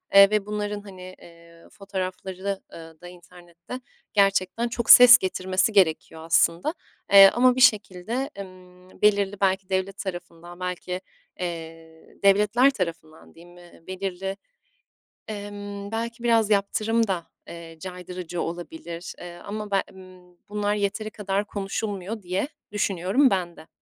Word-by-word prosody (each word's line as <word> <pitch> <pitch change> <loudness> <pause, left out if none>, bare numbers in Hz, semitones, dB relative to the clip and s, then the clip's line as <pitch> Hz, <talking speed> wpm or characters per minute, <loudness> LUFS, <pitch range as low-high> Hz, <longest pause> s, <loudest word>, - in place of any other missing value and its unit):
eee, 200 0 +9
ve 210 -1 0
bunların 210 0 -4
hani, 185 -2 -11
eee, 170 0 -17
fotoğrafları, 190 0 -5
eee, 165 -1 -12
da 175 - -10
internette 175 +6 -12 0.3
gerçekten 195 +3 +2
çok 235 -1 -4
ses 245 0 +11
getirmesi 185 0 -1
gerekiyor 160 -4 +1
aslında. 170 - +2 0.4
Eee, 195 -1 +10
ama 250 +1 +4
bir 255 - -1
şekilde, 220 +3 +2
emm, 185 -1 -13
belirli 205 -1 +2
belki 190 -1 +1
devlet 190 +1 -2
tarafından 175 -2 -8
belki, 180 0 -4 0.4
eee, 165 -2 -8
devletler 210 +7 +4
tarafından 165 -7 -6
diyeyim, 175 +1 -16
ııı, 175 -1 -18
belirli, 190 +1 -4 0.9
emm, 205 -1 -7
belki 230 +1 -4
biraz 225 -2 +3
yaptırım 215 +2 +1
da, 175 -3 -3 0.2
eee, 165 -1 -10
caydırıcı 180 -1 -6
olabilir, 170 0 -7
eee, 175 -1 -9
ama 210 +2 -7
be 195 - +2
emm, 185 -1 -16
bunlar 210 0 -1
yeteri 210 +1 -2
kadar 200 0 -2
konuşulmuyor 200 +1 -4
diye 185 +9 -2 0.2
düşünüyorum 205 +6 +2
ben 180 -4 -2
de. 160 - -15
190 Hz, 130 wpm, -24 LUFS, 175-205 Hz, 0.9 s, ses